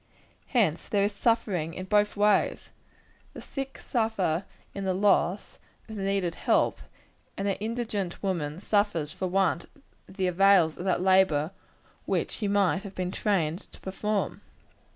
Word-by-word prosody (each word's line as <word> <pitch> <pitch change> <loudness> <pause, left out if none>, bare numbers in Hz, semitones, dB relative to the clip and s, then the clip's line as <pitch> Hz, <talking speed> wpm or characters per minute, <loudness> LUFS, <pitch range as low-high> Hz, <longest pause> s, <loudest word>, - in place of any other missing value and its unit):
Hence 200 - +1
there 200 -1 +2
is 205 +1 0
suffering 200 -7 0
in 185 - -5
both 210 +1 +2
ways. 205 -1 +2 0.6
The - - -7
sick 270 -1 -6
suffer 205 -7 -1 0.3
in 200 - -5
the 190 -1 0
loss 195 -1 +1 0.3
of 220 - -8
the 200 - -4
needed 195 -3 0
help, - - +1 0.6
and 195 - -2
the 195 - +1
indigent 215 -5 -3
woman 170 -4 -2
suffers 205 -8 0
for 185 - -3
want 185 -2 +1 0.4
of 190 - -15
the 190 - +1
avails 180 -3 +4
of 180 - -5
that 185 -1 +1
labor 185 -5 +3 0.6
which - - 0
she 210 - -3
might 200 -2 +2
have 200 -1 -9
been 180 -1 -2
trained 185 -4 -1
to - - -12
perform. 205 +2 -2
195 Hz, 150 wpm, -28 LUFS, 180-205 Hz, 0.6 s, avails